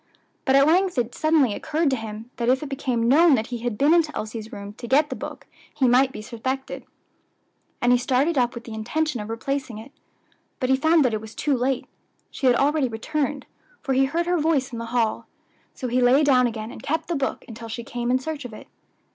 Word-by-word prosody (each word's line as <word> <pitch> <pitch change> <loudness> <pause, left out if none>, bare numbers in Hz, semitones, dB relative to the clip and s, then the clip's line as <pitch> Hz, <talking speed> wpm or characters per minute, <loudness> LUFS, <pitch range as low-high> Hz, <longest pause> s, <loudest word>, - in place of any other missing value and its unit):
But 265 - +3
at 275 0 +6
length 360 +2 +2
it 245 -1 0
suddenly 310 -7 +2
occurred 310 +4 0
to - - +2
him 225 0 -7
that 235 0 0
if 260 +3 +2
it 295 - -6
became 255 -4 -1
known 305 +4 +6
that 220 -2 -1
he 240 - -3
had 235 -2 -3
been 290 +4 +4
into 330 -3 +3
Elsie's 220 +1 -6
room 200 -3 -8
to 240 - -6
get 295 +5 +3
the - - -2
book - - -8 0.3
he 265 - +2
might 255 +2 +4
be 215 - -8
suspected; 260 +4 -5 1.0
and 245 - +4
he 245 - +5
started 270 +6 +1
up 245 -2 +1
with 235 - -7
the 230 - -9
intention 245 +4 -2
of 210 - -7
replacing 255 +1 -3
it. 225 +5 -11 0.7
But 255 -2 0
he - - +6
found 315 +2 +3
that 240 - +1
it 215 - -2
was 220 0 -11
too 290 -2 0
late; 255 +1 -1 0.5
she 270 - -1
had 245 - +5
already 285 +1 +2
returned, 280 +4 -3 0.4
for 270 - 0
he 265 +1 +4
heard 330 +5 -1
her 355 0 +1
voice 295 -5 +1
in 230 - -4
the 230 - -4
hall; 230 -2 -1 0.5
so 255 - -4
he 250 +1 +1
lay 255 +4 +5
down 255 -4 +4
again, 220 -1 -5
and - - -10
kept 320 +2 -2
the 345 - -1
book 275 -4 -2
until 230 0 -9
she 235 +1 -5
came 240 +1 -4
in 255 - +4
search 295 +2 -5
of 245 -3 -8
it. - - -11
260 Hz, 230 wpm, -24 LUFS, 235-290 Hz, 1.0 s, at